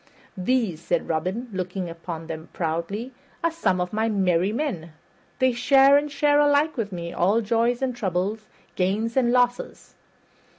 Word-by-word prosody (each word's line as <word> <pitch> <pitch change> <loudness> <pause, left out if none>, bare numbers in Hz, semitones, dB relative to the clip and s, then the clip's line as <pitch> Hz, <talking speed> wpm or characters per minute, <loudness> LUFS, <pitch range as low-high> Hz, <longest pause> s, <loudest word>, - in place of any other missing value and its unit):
"These," 195 -4 0
said 170 0 -1
Robin, 185 +10 -2
looking 185 0 -3
upon 165 -1 -7
them 160 0 -7
proudly, 170 +9 -3 0.3
"are 335 - +2
some 315 - 0
of 180 +2 -3
my 220 +1 +1
merry 190 -2 +1
men. 215 - -3 0.4
They 260 0 +3
share 270 +3 +5
and 290 0 +1
share 290 0 +3
alike 295 +1 +3
with 220 -5 -3
me 170 -2 -5
all 195 +6 +2
joys 235 +3 +1
and 255 -2 -1
troubles, 205 0 -2 0.3
gains 205 +5 0
and 245 -3 +3
losses. 245 0 0
215 Hz, 155 wpm, -24 LUFS, 180-250 Hz, 0.4 s, share